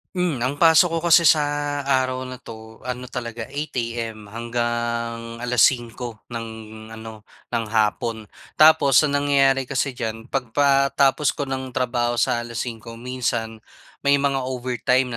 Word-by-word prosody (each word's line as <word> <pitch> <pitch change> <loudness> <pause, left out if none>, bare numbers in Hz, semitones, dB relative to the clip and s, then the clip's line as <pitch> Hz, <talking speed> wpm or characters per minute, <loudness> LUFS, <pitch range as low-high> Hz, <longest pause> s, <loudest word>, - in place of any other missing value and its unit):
Hmm, 180 -6 0
ang 135 - -1
pasok 165 +1 +6
ko - - +1
kasi 170 +1 +7
sa 155 -1 +6 0.4
araw 130 -1 0
na 130 -1 -7
'to 110 -1 -12
ano 125 0 -5
talaga 115 -2 -6
8 145 +3 -5
AM 115 -3 -4
hanggang 115 0 -3
5:00 120 -1 +1
ng 115 -1 -5 0.5
ano 110 -1 -10 0.2
ng 115 - -1
hapon. 110 +1 0 0.3
Tapos, 155 -3 +6
ang 145 -1 +1
nangyayari 135 -2 +2
kasi 140 +1 -1
diyan, 115 -1 -6
pagkatapos 140 +2 +2
ko 140 -2 -4
ng 130 -1 -4
trabaho 120 -2 0
sa 120 0 0
5:00 115 0 -6
minsan 115 -2 -3 0.5
may 140 0 +4
mga 140 -1 +1
overtime 125 0 0
125 Hz, 135 wpm, -22 LUFS, 115-135 Hz, 0.5 s, kasi